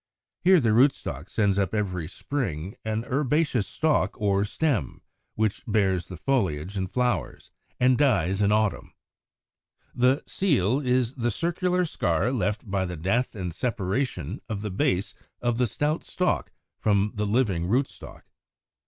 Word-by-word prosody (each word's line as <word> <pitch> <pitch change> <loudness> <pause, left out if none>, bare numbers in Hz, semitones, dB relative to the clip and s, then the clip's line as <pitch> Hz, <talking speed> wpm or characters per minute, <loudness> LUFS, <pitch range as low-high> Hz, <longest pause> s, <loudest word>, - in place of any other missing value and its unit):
Here 185 0 +6
the 115 -6 +2
rootstock 110 - +2
sends 100 -2 +1
up 95 +1 0
every 90 -6 -2
spring 100 - -4
an 110 +1 -2
herbaceous 140 -3 +1
stalk 155 -5 0
or 100 -2 +2
stem, 130 - -1 0.3
which 110 -2 0
bears 95 -5 +1
the 90 - -8
foliage 95 - -1
and 95 -2 -2
flowers, 125 -1 -1 0.3
and 125 +1 +4
dies 95 - +2
in 100 0 +3
autumn. 105 -1 0 1.0
The 130 +4 +2
seal 135 - +1
is 125 -3 +1
the 120 -3 -1
circular 180 - 0
scar 100 - 0
left 105 -2 -1
by 95 -1 0
the 90 -1 -5
death 105 +10 0
and 90 -4 -4
separation 105 - -2
of 105 -2 -3
the 105 - -3
base 95 +1 0 0.3
of 120 -1 -1
the 125 - +3
stout 150 +8 -1
stalk 180 0 -1 0.3
from 105 0 +2
the 105 0 -2
living 100 -7 +1
rootstock. 130 +7 -2
110 Hz, 145 wpm, -26 LUFS, 95-130 Hz, 1.0 s, Here